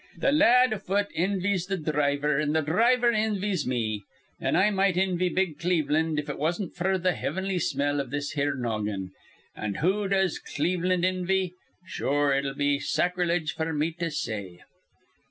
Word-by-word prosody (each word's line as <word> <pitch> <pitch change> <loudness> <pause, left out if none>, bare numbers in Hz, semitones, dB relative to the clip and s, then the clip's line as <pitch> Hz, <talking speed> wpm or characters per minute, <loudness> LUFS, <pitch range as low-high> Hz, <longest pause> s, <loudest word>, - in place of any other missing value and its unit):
Th' 275 - +2
lad 255 -5 +5
afoot 200 0 -1
invies 185 0 0
th' 190 -4 -3
dhriver, 145 -1 +1
an' 150 0 0
th' 160 -2 +1
dhriver 235 - +3
invies 205 -6 0
me; 110 -5 -1 0.4
an' - - 0
I 210 +2 +4
might 195 -2 +2
invy 185 -1 +1
big 180 -5 -1
Cleveland 160 -2 +1
if 150 0 -2
it 140 - -5
wasn't 170 +5 -1
f'r 190 +2 0
th' 185 0 +1
hivinly 190 0 -2
smell 145 0 0
iv 135 - -7
this 145 +1 -3
here 145 -1 0
noggin. 105 -6 -3 0.4
An' 105 -2 -4
who 195 - +1
does 190 -2 +1
Cleveland 180 +3 -1
invy? 185 0 +1 0.3
Sure, 145 -5 0
it'd 135 0 -1
be 145 0 +1
sacreliege 175 -2 0
f'r 160 -1 -2
me 155 +3 +1
to 170 -1 -1
say. 100 - -5
170 Hz, 160 wpm, -27 LUFS, 145-190 Hz, 0.4 s, lad